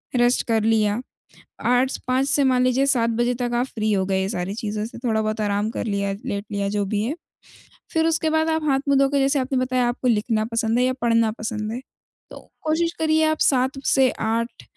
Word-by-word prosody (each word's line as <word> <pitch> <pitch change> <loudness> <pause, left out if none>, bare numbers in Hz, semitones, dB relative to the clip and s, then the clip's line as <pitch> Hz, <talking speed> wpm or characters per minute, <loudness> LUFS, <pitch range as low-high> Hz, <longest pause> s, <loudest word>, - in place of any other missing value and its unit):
Rest 245 0 +3
कर 225 -2 +1
लिया। 220 0 +2 0.6
आठ्स 250 +2 +2
5 260 +2 +1
से 285 -1 +3
मान 255 -1 +3
लीजिए 255 +2 +2
7 240 -4 +2
बजे 240 +2 +1
तक 245 -1 -1
आप 240 +1 +1
फ्री 215 -1 0
हो 190 -1 +1
गए 190 0 0
ये 190 - -2
सारी 185 -2 -3
चीज़ों 215 -1 -3
से, 230 - -9
थोड़ा-बहुत 220 -2 -1
आराम 205 +1 0
कर - - -4
लिया, 200 -2 -1
लेट 200 0 -3
लिया, 200 -1 -1
जो 205 0 -1
भी 205 +1 -1
है, 260 +8 -2 0.8
फिर 320 0 +2
उसके 320 -1 +1
बाद 315 +1 +1
आप 320 0 0
हाथ-मुँह 275 +1 +2
धो 275 - +4
के, 280 0 +1
जैसे 275 +1 +2
आपने 260 +1 -1
बताया 255 -1 +1
आपको 245 +1 -2
लिखना 220 -1 +1
पसंद 230 0 +1
है 250 - +3
या 255 - +1
पढ़ना 230 -2 +3
पसंद 215 -1 -3
है, 235 - -4 0.5
तो - - -9 0.2
कोशिश 325 +2 0
करिए 315 0 +2
आप 315 0 0
7 265 0 +2
से 265 -2 +4
8 225 - -2
240 Hz, 215 wpm, -22 LUFS, 215-270 Hz, 0.8 s, धो